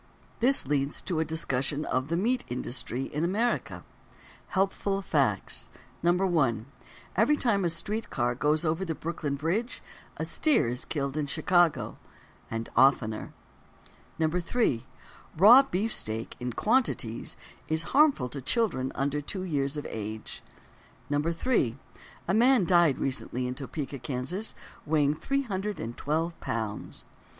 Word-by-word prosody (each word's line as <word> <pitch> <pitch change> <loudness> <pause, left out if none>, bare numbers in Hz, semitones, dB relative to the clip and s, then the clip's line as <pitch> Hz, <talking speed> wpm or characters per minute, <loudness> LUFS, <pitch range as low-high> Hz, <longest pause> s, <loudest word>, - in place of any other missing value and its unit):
This 265 +4 +4
leads 140 +1 0
to 175 -4 -1
a - - +3
discussion 150 -2 0
of: 130 +1 -1
"The 165 +2 0
Meat 245 +7 +1
Industry 125 +1 -2
in 150 +3 -3
America." 220 +7 -1 0.6
Helpful 195 0 0
Facts: 140 - 0 0.3
1. 170 - +2 0.5
Every 235 +10 +4
time 210 -8 +1
a 175 - +2
street 200 +7 -2
car 120 -2 0
goes 150 +5 +1
over 165 +4 0
the 165 -4 -3
Brooklyn 155 -3 -3
Bridge, 175 - -2 0.3
a - - -2
steer 300 - +2
is 125 +1 -3
killed 140 -1 -2
in 150 -2 -1
Chicago—and 155 -7 -1
oftener. 120 -4 +3 0.9
2. 170 - +1 0.6
Raw 220 - +9
beefsteak 185 - -2
in 125 -1 -3
quantities 210 - 0 0.3
is 160 +1 +1
harmful 280 - +4
to 140 +2 -6
children 135 - 0
under 140 +2 -1
two 185 +6 -5
years 145 -4 -1
of 145 - -4
age. 110 0 -6 0.7
3. 150 - +1 0.5
A 175 - +1
man 240 -1 +5
died 170 -5 +4
recently 130 -1 -2
in 125 - -2
Topeka, 140 +1 -5
Kansas, 130 - -3 0.3
weighing 150 -2 +2
312 175 - -2
pounds. 110 -2 -4
155 Hz, 125 wpm, -28 LUFS, 130-195 Hz, 0.9 s, Raw